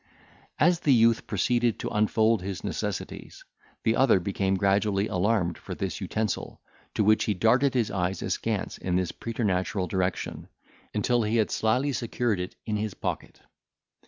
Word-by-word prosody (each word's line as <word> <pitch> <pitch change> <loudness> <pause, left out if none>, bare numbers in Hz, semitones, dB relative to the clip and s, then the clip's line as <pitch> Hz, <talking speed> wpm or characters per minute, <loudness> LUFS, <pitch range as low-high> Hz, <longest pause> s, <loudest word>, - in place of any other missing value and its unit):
As 175 +3 +4
the 140 -6 +4
youth 115 0 +3
proceeded 120 +3 +1
to - - -4
unfold 110 0 +2
his 95 -1 -5
necessities, - - -5 0.4
the 110 - +2
other 130 -7 +4
became 95 +1 0
gradually 100 +1 +2
alarmed 90 -3 0
for - - -7
this - - -4
utensil, 110 -2 -3 0.4
to - - +2
which 110 +1 +4
he 105 - 0
darted 125 +8 +3
his 120 -4 +1
eyes 90 -1 -1
askance - - -2
in 90 -1 -1
this 90 -2 0
preternatural 100 -4 -1
direction, 90 -1 -2 0.4
until 120 +3 +1
he 110 +1 0
had 110 -2 +2
slyly 125 +6 +1
secured 120 -3 -1
it 90 - -5
in 105 -2 -1
his 105 -1 -3
pocket. - - -5
105 Hz, 155 wpm, -27 LUFS, 95-115 Hz, 0.4 s, As